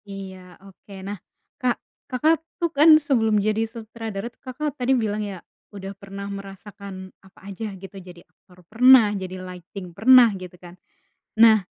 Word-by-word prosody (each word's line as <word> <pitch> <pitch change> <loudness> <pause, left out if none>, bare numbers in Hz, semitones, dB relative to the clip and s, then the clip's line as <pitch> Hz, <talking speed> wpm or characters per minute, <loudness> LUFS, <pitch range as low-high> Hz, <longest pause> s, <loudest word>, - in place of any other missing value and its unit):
Iya, 190 -2 -10
oke, 195 +1 -16
nah, 200 -2 -6 0.4
Kak, 250 -2 +1 0.3
Kakak 305 +5 +2 0.2
tuh, 340 -1 -2
kan, 310 +2 +7
sebelum 235 -8 +1
jadi 215 +2 +1
sutradara 225 -1 -7
tuh, - - -41
Kakak 280 +3 -4
tadi 265 -1 +1
bilang 215 -2 -1
ya, 195 -4 -7 0.2
udah 195 -1 -8
pernah 200 0 -9
merasakan 195 -1 -9
apa 190 -1 -20
aja, 200 +2 -6
gitu, 195 +1 -11
jadi 175 -1 -14
aktor 180 -1 -24
pernah, 235 +1 +6
jadi 185 -2 -5
lighting 180 0 -10
pernah, 235 +3 +6
gitu 180 -1 -10
kan. 175 0 -13 0.6
Nah, 220 -3 +6
205 Hz, 155 wpm, -23 LUFS, 190-235 Hz, 0.6 s, kan